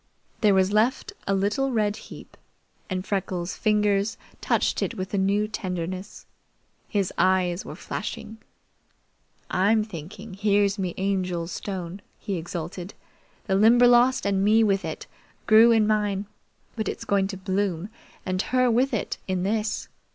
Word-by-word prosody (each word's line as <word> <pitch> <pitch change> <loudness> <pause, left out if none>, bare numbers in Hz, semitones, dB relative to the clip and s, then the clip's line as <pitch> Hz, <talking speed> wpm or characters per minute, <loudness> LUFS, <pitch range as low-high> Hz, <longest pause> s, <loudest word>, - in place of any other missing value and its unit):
There 210 -3 +4
was 190 0 +3
left 240 - +1
a 195 - +2
little 210 +8 0
red 210 -3 +1
heap, - - -12 0.5
and 185 -1 -3
Freckles' 185 -3 -2
fingers 210 -1 +1 0.2
touched - - +1
it - - -2
with 185 +2 -5
a - - +1
new 200 +2 +2
tenderness. 185 -2 -5 0.6
His 200 -3 0
eyes 185 -1 +2
were - - -7
flashing. 220 0 -6 1.1
"I'm 210 +4 +3
thinking 200 +2 -9
here's 200 0 +2
me 185 -3 -2
Angel's 185 -3 -1
stone," 190 -1 -5 0.2
he 200 -4 -3
exulted. 175 +2 -6 0.5
"The 195 - -1
Limberlost, 240 +4 +5
and 195 -1 +1
me 220 +2 +5
with 195 -2 +2
it, - - -5 0.4
grew 225 +1 +7
in 220 -2 +4
mine; 210 -2 0 0.5
but 220 -2 -3
it's - - -6
going 195 -1 +2
to 195 -1 -6
bloom, 190 -1 -2 0.4
and 185 0 0
her 255 +1 +2
with 250 +2 +2
it, 210 - -3
in 185 -1 -1
this! 215 +2 -1
200 Hz, 145 wpm, -25 LUFS, 185-215 Hz, 1.1 s, grew